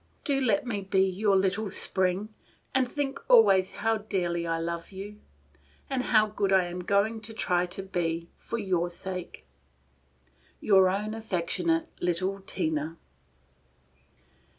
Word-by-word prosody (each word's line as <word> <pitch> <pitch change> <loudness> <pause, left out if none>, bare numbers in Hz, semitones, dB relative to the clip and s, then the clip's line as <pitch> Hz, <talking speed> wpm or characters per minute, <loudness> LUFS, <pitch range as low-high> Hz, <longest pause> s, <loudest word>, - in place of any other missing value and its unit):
Do 275 -2 +1
let 225 -3 +2
me 215 -5 -2
be 190 0 +2
your 195 +2 +1
little 195 +2 +1
Spring, 190 +2 +1 0.4
and 260 -2 +2
think 275 -1 -3
always 195 - +6
how 225 +1 0
dearly 175 -5 -2
I 165 0 0
love 170 +1 -4
you, 200 +2 -8 0.7
and 255 -1 0
how 215 -2 +5
good 205 -2 -1
I 190 -1 +5
am 175 +1 -5
going 200 +4 +1
to 225 0 -6
try 180 -4 +1
to 190 +2 -5
be 170 -3 -2
for 235 - -5
your 180 -5 0
sake. 180 0 -6 1.1
"Your 190 -3 +5
own 210 +3 -2
affectionate 225 - -1
little 185 +3 -1
"TINA." 160 -4 -2
195 Hz, 135 wpm, -28 LUFS, 180-220 Hz, 1.1 s, always